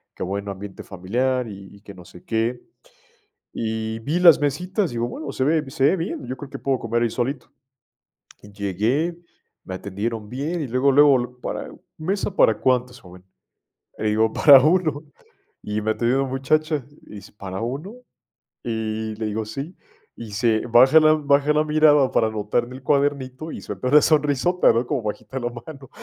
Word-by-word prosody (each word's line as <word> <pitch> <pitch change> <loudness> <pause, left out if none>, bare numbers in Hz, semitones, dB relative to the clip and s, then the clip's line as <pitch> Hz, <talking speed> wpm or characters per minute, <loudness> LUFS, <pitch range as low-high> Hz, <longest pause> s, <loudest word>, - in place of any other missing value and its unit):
que - - -5
buen 100 +2 -4
ambiente 100 0 -8
familiar 120 +7 -2
y 100 -2 -11
y 100 - -18
que 100 -1 -12
no 90 -2 -14
sé 90 - -15
qué. 115 +2 -2 0.9
Y 110 0 -3
vi 150 +10 -1
las 170 -4 +7
mesitas, 180 +6 -1
digo: 120 0 -2
"Bueno, 155 +6 -6
se 130 - -1
ve 155 +2 +1
se 130 - -1
ve 150 +7 +4
bien, 165 -6 -5
yo 130 +2 -5
creo 140 +2 -10
que - - -7
puedo 135 -2 -1
comer 115 +1 -1
ahí 120 - +1
solito". 130 +5 -3 0.9
Llegué, 105 - -2 0.5
me 95 - -6
atendieron 105 +3 -5
bien, 150 +8 -3
y 145 - -3
luego, 130 +3 +2
luego, 145 0 +6
lu 125 0 -7
para - - -5 0.3
"¿Mesa 195 +4 -3
para 110 - +4
cuántos, 125 -1 0
joven?". 90 0 -15 0.7
Le - - -4
digo: 110 +1 +2
"Para 140 -3 +8
1". 155 -2 +1 0.6
Y 105 +1 -3
me 110 +1 +1
atendió 120 +4 +1
una 135 - -3
muchacha 150 +2 0 0.2
y - - -13
dice: 100 0 -12
"¿Para 95 -2 -7
1?". 145 - -5 0.7
Y 110 -1 -3
le 110 0 -4
digo: 110 +1 -3
"Sí". 135 - -7 0.4
Y 115 - -9
se 110 +1 +1
baja 130 +6 +6
la 155 0 +5
baja 145 -1 +2
la 150 0 +2
mirada 150 -3 +4
para 110 - +2
anotar 110 +2 -1
en 125 - -11
el 130 +1 -11
cuadernito, 140 +1 -1
y - - -7
suelta 125 - -5
una 150 +3 +7
sonrisota, 150 +4 +3
¿no?, 115 +2 0
como 140 -3 -1
bajita 110 +5 -5
la 120 -1 -2
mano. 135 +3 -11
125 Hz, 180 wpm, -22 LUFS, 110-145 Hz, 0.9 s, Para